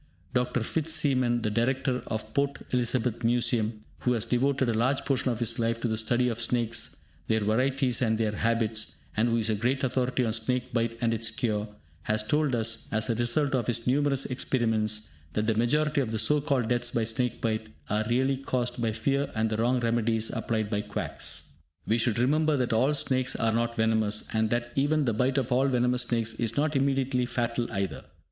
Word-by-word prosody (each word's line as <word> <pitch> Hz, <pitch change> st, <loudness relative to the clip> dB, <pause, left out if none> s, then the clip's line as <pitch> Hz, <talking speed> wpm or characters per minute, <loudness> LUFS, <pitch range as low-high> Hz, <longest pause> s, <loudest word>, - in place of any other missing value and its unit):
Dr. 125 Hz, -1 st, 0 dB
Fitz 160 Hz, +6 st, -1 dB
Seaman, 130 Hz, -6 st, +2 dB
the 105 Hz, -, 0 dB
Director 125 Hz, +3 st, 0 dB
of 110 Hz, -1 st, -3 dB
the 110 Hz, -, -19 dB
Port 140 Hz, 0 st, 0 dB
Elizabeth 120 Hz, -1 st, 0 dB
Museum, 115 Hz, -2 st, +1 dB, 0.2 s
who 125 Hz, -, +1 dB
has 115 Hz, -2 st, 0 dB
devoted 130 Hz, +2 st, +1 dB
a -, -, +1 dB
large 130 Hz, +5 st, +1 dB
portion 130 Hz, -1 st, +1 dB
of 115 Hz, -, -3 dB
his 115 Hz, -1 st, 0 dB
life 115 Hz, 0 st, 0 dB
to 120 Hz, -, -1 dB
the 110 Hz, -, 0 dB
study 120 Hz, +3 st, +1 dB
of 115 Hz, -1 st, -2 dB
snakes, 115 Hz, -1 st, 0 dB, 0.3 s
their 110 Hz, 0 st, +1 dB
varieties 130 Hz, +4 st, +1 dB
and 110 Hz, -3 st, +2 dB
their 110 Hz, -1 st, 0 dB
habits, 110 Hz, -5 st, -1 dB, 0.2 s
and 115 Hz, +3 st, +2 dB
who 115 Hz, -, +2 dB
is 115 Hz, -1 st, 0 dB
a 110 Hz, -, +1 dB
great 125 Hz, +6 st, 0 dB
authority 130 Hz, 0 st, 0 dB
on 110 Hz, -, -1 dB
snake 125 Hz, +3 st, -2 dB
bite 115 Hz, -1 st, 0 dB
and 115 Hz, -1 st, +2 dB
its 115 Hz, 0 st, -1 dB
cure, 110 Hz, -2 st, -1 dB, 0.3 s
has 105 Hz, 0 st, 0 dB
told 145 Hz, +3 st, +1 dB
us, 115 Hz, 0 st, -1 dB
as 110 Hz, +1 st, 0 dB
a -, -, +2 dB
result 120 Hz, +5 st, 0 dB
of 125 Hz, -5 st, 0 dB
his 115 Hz, -1 st, -1 dB
numerous 135 Hz, +1 st, +2 dB
experiments, 110 Hz, -4 st, 0 dB, 0.2 s
that 105 Hz, -, 0 dB
the 110 Hz, -, +2 dB
majority 145 Hz, +6 st, +2 dB
of 125 Hz, -, -2 dB
the 110 Hz, -, -2 dB
so 145 Hz, +7 st, +3 dB
called 135 Hz, -6 st, 0 dB
deaths 120 Hz, 0 st, +2 dB
by 120 Hz, -1 st, 0 dB
snake 115 Hz, +2 st, -1 dB
bite 110 Hz, -1 st, -2 dB, 0.2 s
are 105 Hz, +1 st, 0 dB
really 130 Hz, +3 st, +2 dB
caused 125 Hz, -2 st, -2 dB
by 115 Hz, -1 st, +1 dB
fear 140 Hz, +6 st, -1 dB
and 110 Hz, 0 st, 0 dB
the 110 Hz, -, 0 dB
wrong 120 Hz, +3 st, +2 dB
remedies 115 Hz, -1 st, +1 dB
applied 110 Hz, -2 st, -1 dB
by 105 Hz, -1 st, -1 dB
quacks. 105 Hz, -1 st, -3 dB, 0.3 s
We 115 Hz, +2 st, +1 dB
should 115 Hz, -1 st, +2 dB
remember 150 Hz, +5 st, +2 dB
that 125 Hz, -2 st, 0 dB
all 130 Hz, +7 st, +3 dB
snakes 130 Hz, -2 st, 0 dB
are 115 Hz, -1 st, +1 dB
not 115 Hz, +1 st, 0 dB
venomous, 110 Hz, -2 st, +1 dB
and 110 Hz, 0 st, +1 dB
that 120 Hz, +1 st, -1 dB
even 145 Hz, +2 st, +1 dB
the 115 Hz, -, +1 dB
bite 125 Hz, +5 st, +1 dB
of 130 Hz, -2 st, -1 dB
all 130 Hz, +2 st, +3 dB
venomous 125 Hz, -1 st, +1 dB
snakes 115 Hz, -2 st, -1 dB
is 115 Hz, -1 st, -1 dB
not 150 Hz, +1 st, +1 dB
immediately 135 Hz, -2 st, +1 dB
fatal 120 Hz, 0 st, -2 dB
either. 100 Hz, -3 st, -3 dB
120 Hz, 205 wpm, -28 LUFS, 110-130 Hz, 0.3 s, so